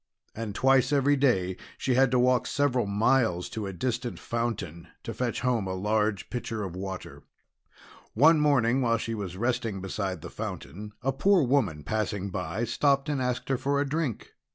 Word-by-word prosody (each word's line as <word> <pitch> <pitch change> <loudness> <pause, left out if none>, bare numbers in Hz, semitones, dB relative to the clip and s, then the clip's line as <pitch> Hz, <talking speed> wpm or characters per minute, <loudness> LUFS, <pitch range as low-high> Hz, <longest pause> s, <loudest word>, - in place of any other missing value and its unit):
And 110 -2 -5
twice 135 +2 +3
every 145 0 +3
day 95 -10 +1 0.2
she 130 - 0
had 130 +1 +4
to 125 - +2
walk 125 0 +3
several 130 -6 +1
miles 105 -3 +2
to 110 -3 -4
a - - -4
distant 120 +5 -3
fountain 105 -8 -4 0.2
to - - -5
fetch 125 -2 -2
home 120 -6 0
a 95 - -2
large 105 0 0
pitcher 115 -3 -3
of 90 -3 -5
water. 95 0 -6 0.9
One 155 +7 +6
morning, 135 -4 +3
while 115 -2 +2
she 115 0 -4
was 95 -4 -5
resting 115 -2 -1
beside 95 -2 -3
the 85 - -8
fountain, 105 -1 -7
a 135 - +2
poor 190 +5 +4
woman 115 - +1
passing 105 -1 -2
by, 90 +3 -3
stopped 140 +4 +1
and 145 -3 -1
asked 125 -1 -2
her 135 - +2
for 140 +1 0
a 145 - 0
drink. 145 -5 -3
115 Hz, 175 wpm, -27 LUFS, 100-130 Hz, 0.9 s, One